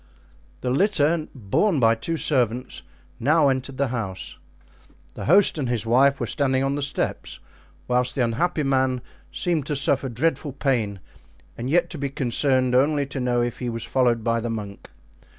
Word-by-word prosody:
The 125 - -1
litter, 160 -1 +2
borne 140 - +1
by 115 -2 +5
two 165 +9 -3
servants, 125 -5 0 0.4
now 150 +3 +3
entered 130 0 -3
the 140 -2 0
house. 105 -6 -5 0.7
The - - -7
host 185 0 +4
and 130 -4 -2
his 120 -2 -1
wife 135 +4 +3
were 120 - -1
standing 130 +3 0
on 135 0 0
the 145 - -2
steps, 145 - -3 0.5
whilst 125 0 +1
the 130 - +1
unhappy 150 +8 0
man 130 -2 +1 0.3
seemed 165 -6 -1
to 150 - -1
suffer 135 -1 +1
dreadful 145 +3 -1
pain 115 -8 -1 0.5
and 120 +2 -5
yet 175 +4 +2
to 160 - -6
be 140 0 -2
concerned 130 0 +1
only 140 +3 +3
to 135 0 -6
know 120 -1 +1
if 120 -1 -4
he 125 - -3
was 115 -1 -4
followed 120 -4 +1
by 115 0 +1
the 120 +1 -3
monk. 105 -3 -6
130 Hz, 170 wpm, -23 LUFS, 120-145 Hz, 0.7 s, by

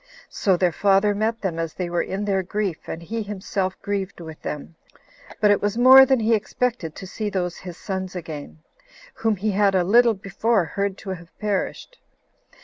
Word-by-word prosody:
So 190 -3 +2
their 180 -1 +2
father 200 +3 +3
met 220 +2 -1
them 175 -4 -2
as 165 -1 -3
they 180 - -3
were 175 0 0
in 195 +2 -3
their 195 -2 +1
grief, 190 -2 -3
and 165 - -5
he 225 +6 -3
himself 195 -2 -3
grieved 200 -2 -3
with 160 -2 -9
them; 150 +2 -6 0.7
but 210 -1 +5
it 205 - +2
was 205 +2 -1
more 260 +2 +9
than 265 -1 +3
he 225 +1 +2
expected 220 -5 -1
to - - -8
see 210 +3 -4
those 180 -3 -2
his 180 -2 -9
sons 190 -2 -5
again, 155 -2 -8 0.5
whom 225 -1 0
he 210 +3 -1
had 200 0 +3
a 185 - +3
little 230 +4 +5
before 195 +1 0
heard 200 +4 -2
to 195 - -7
have 175 -2 -9
perished. 210 - -3
195 Hz, 190 wpm, -23 LUFS, 180-215 Hz, 0.7 s, more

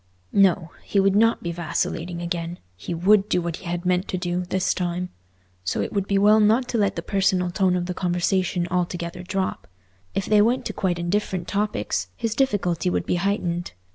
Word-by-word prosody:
No! 180 -4 +3
He 200 - 0
would 195 0 +3
not 225 +2 +3
be 170 - -2
vacillating 170 +1 -2
again—he 170 - -5
would 195 +4 +3
do 180 - +2
what 170 -1 -3
he - - -13
had 175 +1 -3
meant 180 +1 +1
to 185 - -2
do, 180 0 -2
this 185 +1 0
time. 180 0 -2 0.5
So 90 - -1
it - - -2
would 200 -2 -1
be 200 - +2
well 210 +2 +6
not 220 +4 +3
to 235 - 0
let 200 -1 +1
the - - -4
personal 190 -2 +1
tone 185 -1 +2
of 175 -1 -1
the 180 - -3
conversation 180 0 0
altogether 175 -1 -2
drop. 190 +1 -3 0.5
If 195 - 0
they 210 -1 +4
went 240 +4 +2
to - - -3
quite 180 -3 0
indifferent 180 0 -1
topics, 105 - -1
his 225 -2 -2
difficulty 190 -9 +1
would - - -1
be 180 - 0
heightened. 175 - -1
180 Hz, 195 wpm, -24 LUFS, 175-200 Hz, 0.5 s, well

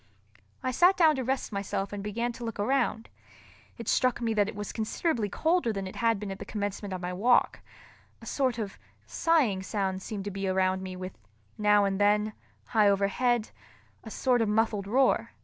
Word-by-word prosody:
I 255 - 0
sat 355 +9 +4
down 320 -4 +5
to 260 - -1
rest 265 0 -2
myself 200 0 -3
and 200 -1 -5
began 230 +4 -2
to 235 - -9
look 225 -2 -5
around. 230 0 0 0.7
It 230 - -8
struck 255 -2 +2
me 230 -2 0
that 205 -1 +2
it - - -8
was 205 0 -5
considerably 225 0 -1
colder 320 - +1
than 195 -2 -4
it 185 - -8
had 230 -3 +2
been 205 -1 -5
at 195 - -7
the - - -5
commencement 205 -1 -4
of 185 -1 -4
my 180 0 -3
walk—a 235 +7 -1
sort 260 -4 0
of 210 -4 -5 0.3
sighing 275 - +2
sound 190 0 -2
seemed 200 0 -5
to 205 - -3
be 195 0 -3
around 185 0 +1
me 185 -1 -6
with, 185 0 -7 0.4
now 210 -1 +4
and 195 0 -1
then, 210 +1 +3 0.3
high 215 -3 +3
overhead, 215 +4 +1 0.5
a 225 - -8
sort 245 +1 +1
of 220 - +1
muffled 210 -2 +1
roar. 260 +5 +2
210 Hz, 190 wpm, -28 LUFS, 195-240 Hz, 0.7 s, down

